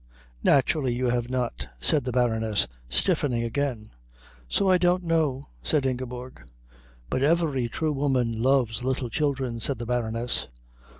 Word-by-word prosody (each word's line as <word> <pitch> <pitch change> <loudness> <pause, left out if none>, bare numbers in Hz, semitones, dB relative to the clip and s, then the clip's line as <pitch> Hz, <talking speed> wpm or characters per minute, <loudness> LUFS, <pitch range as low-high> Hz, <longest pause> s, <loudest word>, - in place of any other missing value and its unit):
"Naturally 135 -2 +3
you 125 0 0
have 120 0 -1
not," 125 - -2
said 125 - +2
the 125 - -1
Baroness, 110 -4 +1 0.2
stiffening 115 - +2
again. 115 -2 -2 0.6
"So 195 - +2
I 185 -1 +5
don't 180 +1 +2
know," 155 -5 0
said 150 -3 +1
Ingeborg. 125 - -4 0.7
"But 130 - 0
every 145 -5 +2
true 155 +4 -1
woman 130 -5 0
loves 125 -3 +2
little 130 -1 -1
children," 135 -5 -1
said 130 +3 0
the 120 - -5
Baroness. 115 0 -2
130 Hz, 135 wpm, -26 LUFS, 120-140 Hz, 0.7 s, I